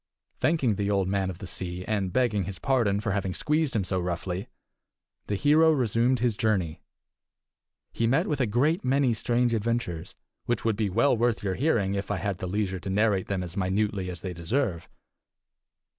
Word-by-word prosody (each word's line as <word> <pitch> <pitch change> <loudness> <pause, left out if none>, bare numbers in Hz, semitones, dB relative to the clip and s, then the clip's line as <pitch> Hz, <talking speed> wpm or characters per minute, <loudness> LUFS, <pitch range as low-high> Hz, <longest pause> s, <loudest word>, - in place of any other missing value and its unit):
Thanking 135 - +2
the 100 -1 -1
Old 100 -2 +1
Man 95 -1 0
of 90 - -6
the 95 - -8
Sea, 90 0 -4
and 100 -4 -1
begging 105 -4 +1
his 95 -1 -5
pardon 115 -7 +1
for 105 -2 -1
having 95 -2 -2
squeezed 150 -3 0
him 105 - +2
so 95 0 -1
roughly, 90 +2 -3 0.8
the 105 - -1
hero 155 +8 +5
resumed 125 -2 +2
his 120 -3 +2
journey. 95 -7 0 1.1
He 115 - 0
met 130 +4 +2
with 145 -3 -1
a 125 - +2
great 145 - +1
many 130 -1 +2
strange 120 +2 +1
adventures, 110 -7 -2 0.3
which 120 -2 -1
would 110 -2 +2
be 105 -1 0
well 115 +8 +3
worth 120 -1 0
your 95 -2 0
hearing 110 - +1
if 100 -1 -3
I 105 - 0
had 95 +1 -3
leisure 95 0 -2
to 95 - -6
narrate 100 -1 +1
them 95 -2 -2
as 90 0 -6
minutely 100 0 0
as 90 -1 -7
they 95 -2 -4
deserve. 85 +1 -2
105 Hz, 185 wpm, -27 LUFS, 95-120 Hz, 1.1 s, hero